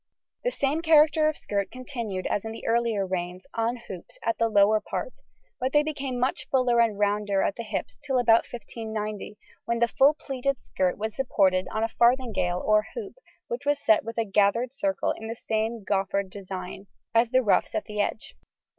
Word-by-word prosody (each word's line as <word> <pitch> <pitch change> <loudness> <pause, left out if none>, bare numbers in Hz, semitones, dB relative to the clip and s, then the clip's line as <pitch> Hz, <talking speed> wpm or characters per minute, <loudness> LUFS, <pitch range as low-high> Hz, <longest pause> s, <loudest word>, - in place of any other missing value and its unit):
] - - -62
The - - +2
same 290 - -1
character 310 -1 +5
of 310 - -4
skirt 200 -1 -2
continued 235 -7 -5
as 205 - -1
in 220 - -5
the 225 - -9
earlier 230 -4 +1
reigns 180 0 -4
on 230 +1 0
hoops 185 -3 -9
at 230 - 0
the 230 0 +2
lower 210 +1 +4
part, - - -4 0.5
but 260 +1 -1
they 295 0 +5
became 275 -4 -3
much 255 +2 -1
fuller 250 -3 +3
and 225 -3 +1
rounder 205 -1 +1
at 200 - 0
the - - -5
hips 215 -3 -5
till 270 -3 0
about 230 -2 +5
1590, 220 -3 -5 0.3
when 235 0 0
the 235 0 +3
full 275 +5 +4
pleated 275 -2 -2
skirt 185 -1 -1
was 220 +1 -4
supported 190 -8 +2
on 220 - -2
a - - +2
farthingale 230 -7 +1
or 215 0 +3
hoop 430 -5 -6 0.3
which 480 0 -4
was 290 0 +3
set 220 -6 +3
with 230 +1 -7
a 230 - +1
gathered 210 +5 +2
circle 290 +1 0
in 220 - -6
the 230 - -4
same 220 0 -2
goffered 195 0 0
design 190 0 -7 0.3
as 230 +1 +4
the 255 +1 +3
ruffs 205 - +2
at 215 - -1
the 210 -1 -2
edge. 215 - -3
225 Hz, 195 wpm, -26 LUFS, 205-255 Hz, 0.5 s, character